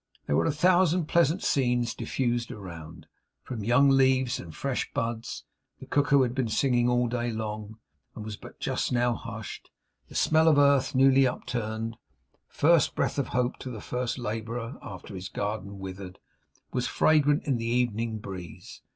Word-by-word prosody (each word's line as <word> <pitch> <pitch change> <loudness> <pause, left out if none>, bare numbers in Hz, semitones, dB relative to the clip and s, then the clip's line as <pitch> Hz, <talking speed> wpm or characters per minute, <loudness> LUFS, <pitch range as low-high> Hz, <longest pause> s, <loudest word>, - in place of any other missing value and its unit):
There 70 - 0
were - - +2
a - - +2
thousand 175 +2 +3
pleasant 170 +2 +2
scents 120 -3 +1
diffused 120 0 -2
around, 85 -6 -9 0.4
from 115 -5 -5
young 125 +6 +4
leaves 130 -1 +3
and 85 - -8
fresh 135 -2 -2
buds; 115 0 -3 0.4
the - - -10
cuckoo 145 -1 +3
had 120 -1 -1
been 130 -2 0
singing 120 +1 +2
all 125 0 +2
day 120 0 -2
long, 110 -1 -5 0.4
and 105 - -7
was 110 -1 -5
but - - -13
just - - -1
now 120 0 +2
hushed; - - -8 0.4
the - - -13
smell 160 +1 +3
of 155 -3 +5
earth 140 -2 +4
newly 135 0 +5
upturned, 115 -2 -4 0.5
first 165 0 +3
breath - - 0
of 140 - -1
hope 125 0 -1
to 130 - -6
the 115 -4 -6
first 125 +4 -3
labourer 115 +2 -4
after 95 +2 -9
his 95 0 -6
garden 100 -1 -4
withered, 95 -1 -8 0.6
was - - 0
fragrant 150 -2 +3
in 135 -5 +1
the 115 0 -3
evening 115 -2 0
breeze. 95 -5 -9
120 Hz, 165 wpm, -27 LUFS, 110-135 Hz, 0.6 s, of